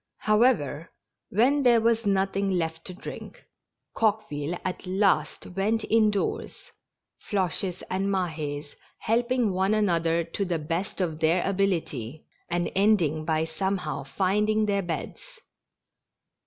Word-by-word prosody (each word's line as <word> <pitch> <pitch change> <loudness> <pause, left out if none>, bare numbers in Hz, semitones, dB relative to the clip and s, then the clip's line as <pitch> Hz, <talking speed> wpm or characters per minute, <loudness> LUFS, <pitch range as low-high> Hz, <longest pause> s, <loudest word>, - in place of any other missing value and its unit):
However, 210 - +2 0.4
when 260 +8 +3
there 240 -3 +5
was 230 -1 +1
nothing 195 0 +1
left 165 -3 -2
to 185 - -6
drink, 190 - -9 0.5
Coque 215 -1 +1
ville 150 +4 -3
at 185 0 -4
last 195 +2 +1
went 205 +5 -1
indoors, 215 -3 0 0.6
Floches 185 -2 -1
and 190 +1 -1
Mahes 155 -6 -3 0.2
helping 235 -1 +1
one 190 +3 +2
another 170 -5 +2
to 165 +4 -3
the 175 -3 -1
best 165 +6 -3
of 160 -4 -2
their 165 +3 +2
ability, 165 - -1 0.2
and 175 0 -1
ending 180 -7 +2
by 160 0 +1
some 190 +5 -1
how 155 -5 -4
finding 210 +8 +1
their 200 -1 +1
beds. 175 -3 -5
190 Hz, 125 wpm, -26 LUFS, 165-210 Hz, 0.6 s, there